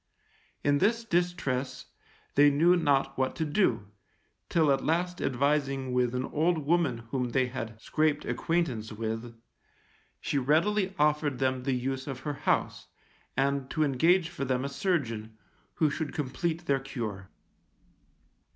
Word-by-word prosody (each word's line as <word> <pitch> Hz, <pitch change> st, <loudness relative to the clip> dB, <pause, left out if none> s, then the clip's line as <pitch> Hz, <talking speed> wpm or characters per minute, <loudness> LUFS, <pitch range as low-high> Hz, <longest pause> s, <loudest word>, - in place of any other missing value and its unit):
In 145 Hz, 0 st, +3 dB
this 230 Hz, +5 st, +2 dB
distress 170 Hz, -, -1 dB, 0.5 s
they 145 Hz, +1 st, +6 dB
knew 165 Hz, +5 st, +4 dB
not 140 Hz, -5 st, +2 dB
what 130 Hz, 0 st, 0 dB
to 160 Hz, -, -1 dB
do, 125 Hz, -, +1 dB, 0.6 s
till 160 Hz, -4 st, +3 dB
at 135 Hz, -1 st, +1 dB
last 175 Hz, +2 st, 0 dB
advising 135 Hz, 0 st, 0 dB
with 125 Hz, -1 st, +1 dB
an 125 Hz, +1 st, -1 dB
old 160 Hz, 0 st, 0 dB
woman 150 Hz, -8 st, +1 dB
whom 125 Hz, -2 st, -1 dB
they 130 Hz, -1 st, +3 dB
had 115 Hz, -3 st, -6 dB
scraped 155 Hz, +4 st, 0 dB
acquaintance 135 Hz, -11 st, -1 dB
with, 115 Hz, +1 st, -5 dB, 0.8 s
she 140 Hz, -, -1 dB
readily 190 Hz, +8 st, +2 dB
offered 150 Hz, -3 st, +2 dB
them 130 Hz, -1 st, 0 dB
the 135 Hz, +1 st, -1 dB
use 130 Hz, +2 st, -3 dB
of 135 Hz, -2 st, -5 dB
her 150 Hz, 0 st, -3 dB, 0.2 s
house, -, -, 0 dB, 0.5 s
and 140 Hz, -1 st, 0 dB
to 155 Hz, -, +1 dB
engage 165 Hz, +6 st, +3 dB
for 140 Hz, -, -5 dB
them 130 Hz, 0 st, 0 dB
a -, -, -2 dB
surgeon, 115 Hz, -, -2 dB, 0.4 s
who 155 Hz, -3 st, +2 dB
should 155 Hz, 0 st, -3 dB
complete 160 Hz, +4 st, -2 dB
their 140 Hz, -4 st, +2 dB
cure. 110 Hz, -8 st, -6 dB
140 Hz, 140 wpm, -29 LUFS, 125-160 Hz, 0.8 s, they